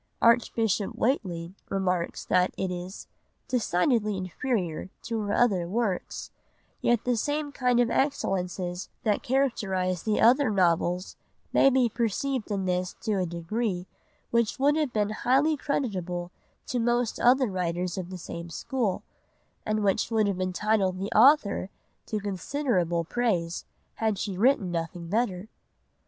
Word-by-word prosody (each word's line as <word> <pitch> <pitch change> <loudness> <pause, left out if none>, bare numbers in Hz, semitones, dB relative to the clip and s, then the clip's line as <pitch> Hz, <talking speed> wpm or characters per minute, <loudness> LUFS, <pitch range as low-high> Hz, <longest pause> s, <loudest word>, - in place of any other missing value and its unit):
Archbishop 225 -3 +2
Whateley 180 - -1 0.2
remarks 180 -3 -1
that 180 0 +2
it 190 -1 -1
is 180 +2 -6 0.4
"decidedly 215 - +1
inferior 185 -2 -2
to 230 -1 -2
her 205 -1 -2
other 195 -9 +2
works—yet 225 +2 -3
the 250 -1 +1
same 290 +5 -1
kind 250 -3 +1
of 240 -1 +3
excellences 185 -9 -1
that 210 -3 +1
characterise 195 -9 0
the 215 -1 0
other 255 +3 +5
novels 180 -2 +1 0.4
may 275 - +6
be 260 -2 +3
perceived 235 +2 -1
in 195 -2 -1
this 180 0 -1
to 215 -4 0
a 180 - 0
degree 180 +3 -2 0.5
which 235 -2 +1
would 285 +2 +3
have 305 -4 0
been 210 -2 0
highly 270 +8 +2
creditable 185 - -2 0.3
to 250 - -2
most 240 0 +1
other 260 +2 +5
writers 180 -1 -2
of 185 -2 -5
the 185 - -6
same 170 0 -7
school, 215 +3 -2 0.6
and 215 0 0
which 195 +1 +1
would 220 -2 +2
have 195 -2 -1
entitled 190 +1 +1
the 195 +2 -4
author 220 -6 +5 0.4
to 215 - -2
considerable 190 - -1
praise 175 -4 -1 0.3
had 220 -2 0
she 195 -1 -3
written 205 -3 +3
nothing 170 0 -4
better." 205 -2 -1
205 Hz, 135 wpm, -27 LUFS, 180-240 Hz, 0.6 s, may